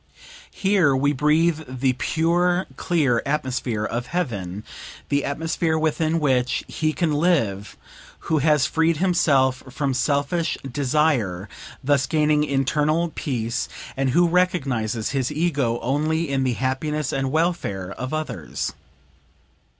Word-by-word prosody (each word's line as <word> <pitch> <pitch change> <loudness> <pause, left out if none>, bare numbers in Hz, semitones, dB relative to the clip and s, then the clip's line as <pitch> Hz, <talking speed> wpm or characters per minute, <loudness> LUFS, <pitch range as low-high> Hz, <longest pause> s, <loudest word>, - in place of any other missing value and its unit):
Here 190 -8 +3
we 140 +2 +2
breathe 155 +3 +2
the 130 0 0
pure, 175 +6 +1
clear 145 -9 +1
atmosphere 130 -6 -1
of 120 +3 -3
heaven, 105 - -3 0.5
the 140 0 +1
atmosphere 160 +2 -1
within 160 +1 +1
which 130 -4 +1
he 155 -1 -1
can 165 0 0
live 140 - 0 0.4
who 160 -2 0
has 150 -1 +3
freed 165 0 +1
himself 140 -8 +2
from 135 +1 -1
selfish 145 +5 0
desire, 130 - 0 0.4
thus 140 -1 +2
gaining 150 -1 +2
internal 150 +4 +1
peace, 120 -3 -2 0.3
and 135 0 0
who 175 +7 +4
recognizes 135 -11 0
his 135 -1 -1
ego 145 -7 0
only 155 +5 0
in 135 -1 0
the 125 - +1
happiness 135 +4 -2
and 135 -1 -1
welfare 155 - -1
of 130 +5 -5
others. 155 0 -4
145 Hz, 120 wpm, -23 LUFS, 130-160 Hz, 0.5 s, who